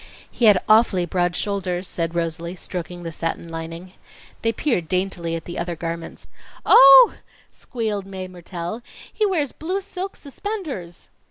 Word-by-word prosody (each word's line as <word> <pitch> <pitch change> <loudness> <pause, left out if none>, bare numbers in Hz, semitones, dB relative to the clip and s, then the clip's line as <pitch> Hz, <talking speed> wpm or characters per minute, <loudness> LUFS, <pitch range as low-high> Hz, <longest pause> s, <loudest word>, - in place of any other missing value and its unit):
"He 240 - 0
had 205 -4 +6
awfully 215 -5 +4
broad 175 0 0
shoulders," 185 -2 -2
said 165 0 -3
Rosalie, 170 +1 -2
stroking 175 -1 -6
the 165 - -5
satin 165 +1 -4
lining. 165 +3 -7 0.5
They 225 - +2
peered 230 - -1
daintily 180 -2 -1
at 165 - -6
the 175 - -6
other 170 0 -3
garments. 165 0 -6 0.4
"Oh!" 275 - +9 0.4
squealed 215 -5 -4
Mae 190 -1 -6
Mertelle. 175 +3 -6 0.3
"He 430 - +1
wears 315 -9 0
blue 365 +5 -3
silk 385 -1 -6
suspenders." 285 - -6
185 Hz, 145 wpm, -22 LUFS, 170-235 Hz, 0.5 s, Oh